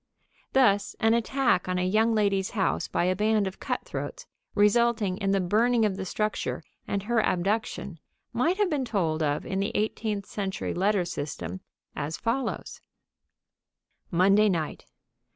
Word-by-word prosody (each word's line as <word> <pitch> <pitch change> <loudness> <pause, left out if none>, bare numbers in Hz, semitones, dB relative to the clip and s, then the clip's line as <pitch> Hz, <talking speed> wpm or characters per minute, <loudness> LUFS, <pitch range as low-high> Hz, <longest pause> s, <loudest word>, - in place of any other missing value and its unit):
Thus, 205 -7 +3
an 225 0 +4
attack 235 -5 +1
on 180 - 0
a 180 - +1
young 220 +4 +3
lady's 200 -3 +1
house 190 - +1
by - - 0
a 185 +1 +2
band 210 +1 +2
of 190 0 -5
cutthroats, - - -4 0.3
resulting 210 -2 +3
in 195 - -1
the 195 0 +3
burning 225 +5 +3
of 200 -3 0
the 190 0 -4
structure 215 +3 -2 0.2
and 200 -1 -2
her 230 +1 +2
abduction, 195 -1 -1 0.3
might 335 +10 +1
have 415 -1 +3
been 285 -3 0
told 175 -10 0
of 145 -1 0
in 190 - -2
the 200 - 0
eighteenth 210 -1 -1
century 195 -2 -3
letter 195 0 +1
system 95 - -5 0.3
as 150 +3 -3
follows: 245 +3 -3 1.3
_Monday 195 +4 +5
night. 165 -5 -3
200 Hz, 150 wpm, -27 LUFS, 185-225 Hz, 1.3 s, Monday